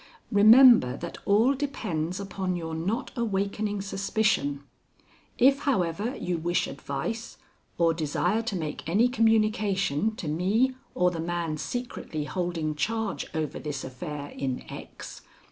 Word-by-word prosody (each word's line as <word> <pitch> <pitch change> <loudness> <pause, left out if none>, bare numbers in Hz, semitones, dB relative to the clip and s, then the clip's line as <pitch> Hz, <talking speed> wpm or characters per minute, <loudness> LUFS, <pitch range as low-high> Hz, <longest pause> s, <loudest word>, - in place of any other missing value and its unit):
Remember 215 - +7
that 170 - -7
all 220 +7 +4
depends 195 - -3
upon 190 -2 -3
your 165 -2 -4
not 190 +10 -2
awakening 205 -2 -1
suspicion. 195 -8 0 0.7
If, 275 +2 +5
however, 220 - 0
you 175 -7 -2
wish 175 +2 0
advice 140 +12 -5 0.4
or 165 -1 +3
desire 170 +6 0
to 230 -3 -3
make 155 -2 -4
any 215 +8 +4
communication 215 - +1
to 170 - -6
me 200 +12 +2 0.2
or 180 0 +3
the 170 - -5
man 165 -1 -2
secretly 235 -7 -4
holding 170 -1 -2
charge 220 +6 -2
over 155 -2 -2
this 145 -2 -4
affair 145 +2 -6
in 130 -2 -4
X. - - -9
185 Hz, 130 wpm, -27 LUFS, 160-220 Hz, 0.7 s, Remember